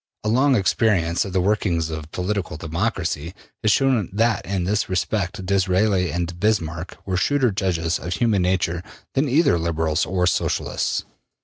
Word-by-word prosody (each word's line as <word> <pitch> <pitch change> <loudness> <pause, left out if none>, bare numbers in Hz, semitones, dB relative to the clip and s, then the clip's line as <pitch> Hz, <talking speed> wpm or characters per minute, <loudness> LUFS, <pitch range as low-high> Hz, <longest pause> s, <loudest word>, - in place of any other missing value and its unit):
A 105 - 0
long 130 +4 +4
experience 95 -4 +2
of 95 - -6
the 95 - +2
workings 90 -5 0
of 80 -1 -6
political 95 -3 -2
democracy 85 -1 -2 0.3
has 110 - +3
shown 130 -6 +2
that 115 +2 +1
in 95 -2 -1
this 105 +3 0
respect 95 0 -1
Disraeli 95 0 +2
and 85 0 -3
Bismarck 85 -5 -1
were 95 -2 -1
shrewder 135 +2 +2
judges 85 -4 -1
of 90 - -4
human 110 -5 +2
nature 90 -2 0 0.3
than 140 +1 +1
either 135 - +3
Liberals 80 -1 0
or 90 -1 +1
Socialists. 90 - 0
95 Hz, 150 wpm, -22 LUFS, 85-105 Hz, 0.3 s, long